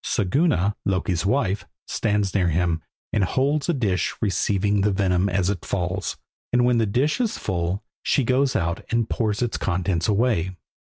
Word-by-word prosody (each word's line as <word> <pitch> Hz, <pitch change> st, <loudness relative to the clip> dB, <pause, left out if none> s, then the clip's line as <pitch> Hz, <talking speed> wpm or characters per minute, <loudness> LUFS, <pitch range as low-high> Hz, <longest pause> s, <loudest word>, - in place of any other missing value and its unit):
Siguna, 105 Hz, -, +1 dB
Loki's 95 Hz, -1 st, 0 dB
wife, 100 Hz, -6 st, 0 dB, 0.2 s
stands 105 Hz, -3 st, 0 dB
near 95 Hz, -3 st, +2 dB
him, 85 Hz, 0 st, +1 dB, 0.3 s
and 105 Hz, -, +2 dB
holds 140 Hz, -, +1 dB
a -, -, +4 dB
dish 95 Hz, -9 st, 0 dB
receiving 100 Hz, 0 st, +1 dB
the 105 Hz, -, +3 dB
venom 95 Hz, -1 st, +1 dB
as 95 Hz, 0 st, +1 dB
it 100 Hz, -, -5 dB
falls, 90 Hz, 0 st, -2 dB, 0.3 s
and 125 Hz, 0 st, +3 dB
when 125 Hz, -1 st, +3 dB
the 110 Hz, -, +2 dB
dish 140 Hz, -, +1 dB
is 230 Hz, -3 st, -1 dB
full 90 Hz, +1 st, -2 dB, 0.2 s
she 135 Hz, -, +2 dB
goes 130 Hz, +2 st, +2 dB
out 85 Hz, 0 st, -1 dB
and 115 Hz, 0 st, 0 dB
pours 110 Hz, 0 st, 0 dB
its 120 Hz, -, -1 dB
contents 90 Hz, -2 st, 0 dB
away. 100 Hz, -5 st, +1 dB
100 Hz, 165 wpm, -24 LUFS, 90-120 Hz, 0.3 s, a